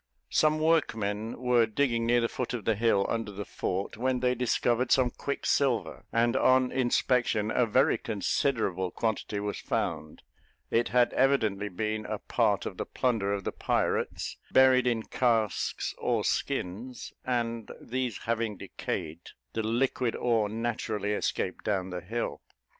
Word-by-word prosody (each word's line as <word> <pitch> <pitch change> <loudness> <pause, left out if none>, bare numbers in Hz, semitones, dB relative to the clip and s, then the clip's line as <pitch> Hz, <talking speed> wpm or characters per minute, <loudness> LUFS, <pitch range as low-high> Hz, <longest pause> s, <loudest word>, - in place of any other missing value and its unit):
Some 155 0 +3
workmen 115 -10 0
were 125 -2 +3
digging 115 -1 0
near 120 0 +4
the 115 - +2
foot 125 +1 -3
of 115 - -6
the 115 - +3
hill 105 -2 +2
under 115 -2 -2
the 100 +1 -6
fort, 95 +3 -3
when 130 +2 0
they 125 0 +2
discovered 125 0 +1
some 125 -2 +4
quicksilver, 140 -3 -1
and 115 +1 +2
on 130 -1 +4
inspection, 120 -4 +1
a 125 0 +2
very 130 +5 +3
considerable 100 -3 0
quantity 110 +1 -2
was 105 0 -3
found; 75 - -3 0.5
it 120 +1 +2
had 125 -1 +3
evidently 110 -7 +2
been 110 +3 -3
a - - -2
part - - +1
of - - -5
the - - -3
plunder 110 -6 0
of 100 -1 -2
the - - -2
pirates, - - -1
buried 130 -1 +5
in 115 -2 +1
casks 115 -6 0
or - - 0
skins, 115 +8 -3
and 115 -3 -2
these 125 -3 -3
having 115 -3 -1
decayed, 80 -2 -5 0.3
the 115 - -1
liquid 120 +2 0
ore 115 -4 +1
naturally 110 -2 -2
escaped 95 -2 -2
down 95 -3 -1
the 90 -1 -4
hill. 115 +7 -3
115 Hz, 145 wpm, -29 LUFS, 105-125 Hz, 0.5 s, buried